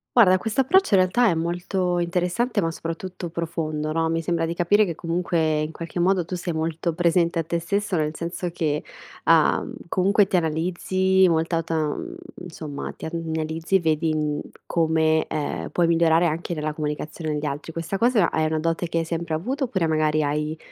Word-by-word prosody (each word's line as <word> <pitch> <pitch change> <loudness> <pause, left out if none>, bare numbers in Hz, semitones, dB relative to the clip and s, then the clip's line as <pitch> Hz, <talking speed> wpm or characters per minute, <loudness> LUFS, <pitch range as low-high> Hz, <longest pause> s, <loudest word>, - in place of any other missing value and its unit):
Guarda, 185 -6 +7
questo 220 +6 -3
approccio 310 - +4
in - - +5
realtà 225 +7 +3
è - - +2
molto 175 +2 -1
interessante 180 +7 0
ma 165 - +1
soprattutto 170 +2 -6
profondo, 155 -2 -3
no, 165 0 +1
mi 165 0 0
sembra 165 -1 0
di 165 - -2
capire 195 +5 +3
che 175 -4 -2
comunque 165 -2 0
in 155 +1 -3
qualche 170 +2 -4
modo 185 -1 +2
tu 180 - -4
sei 175 0 -3
molto 160 +1 -2
presente 170 0 +2
a 160 - -1
te 170 +1 -1
stesso, 200 +3 -1
nel 155 -1 0
senso 170 +2 -4
che, 150 -3 -1 0.4
uhm, - - +3 0.2
comunque 195 +3 +3
ti 190 - -1
analizzi 180 +3 +2
molta 165 0 +1
ta 165 0 -3
uhm, 160 - -2 0.3
insomma 155 -4 -6
ti - - -8
analizzi 160 +2 -1
vedi, 160 -1 +1
uhm, 150 -1 -1 0.2
come, 160 -1 +2
ehm, 145 - -3
puoi 175 -1 +2
migliorare 165 0 +4
anche 170 +2 -2
nella 155 0 -2
comunicazione 155 +1 -4
agli 150 0 -2
altri. 145 +3 -4
Questa 165 +4 -3
cosa 230 -5 +3
a - - -3
è - - +2
una 155 0 -1
dote 165 +1 -1
che 165 - -1
hai 165 - 0
sempre 165 -1 -3
avuto, 260 - -2
oppure 190 -9 0
magari 155 -1 +2
hai 150 +2 -1
165 Hz, 190 wpm, -24 LUFS, 160-180 Hz, 0.4 s, Guarda